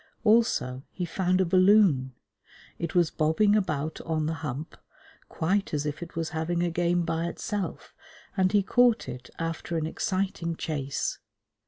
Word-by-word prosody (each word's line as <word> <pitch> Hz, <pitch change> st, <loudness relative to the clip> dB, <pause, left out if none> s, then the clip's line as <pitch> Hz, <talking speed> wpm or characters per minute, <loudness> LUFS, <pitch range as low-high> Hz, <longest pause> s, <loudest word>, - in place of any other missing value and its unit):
Also 210 Hz, -, +3 dB
he 180 Hz, -, -4 dB
found 185 Hz, +2 st, 0 dB
a 190 Hz, -, +3 dB
balloon. 185 Hz, -, +4 dB, 0.6 s
It 170 Hz, 0 st, -4 dB
was 175 Hz, -3 st, +3 dB
bobbing 160 Hz, +7 st, +3 dB
about 160 Hz, -7 st, -1 dB
on 160 Hz, -2 st, -1 dB
the 160 Hz, -, -1 dB
Hump, 150 Hz, +2 st, -5 dB, 0.5 s
quite 190 Hz, +1 st, 0 dB
as 145 Hz, 0 st, -1 dB
if 150 Hz, +1 st, -3 dB
it 170 Hz, -, -8 dB
was 165 Hz, -1 st, -2 dB
having 170 Hz, +2 st, -1 dB
a 175 Hz, -, 0 dB
game 175 Hz, +1 st, +1 dB
by 165 Hz, 0 st, -1 dB
itself, 195 Hz, 0 st, -4 dB, 0.4 s
and 185 Hz, -1 st, +2 dB
he 205 Hz, -1 st, +3 dB
caught 245 Hz, +2 st, +3 dB
it 125 Hz, 0 st, -8 dB
after 165 Hz, 0 st, -3 dB
an 155 Hz, -, -1 dB
exciting 180 Hz, 0 st, -2 dB
chase. 140 Hz, -4 st, -3 dB
170 Hz, 155 wpm, -27 LUFS, 155-190 Hz, 0.6 s, balloon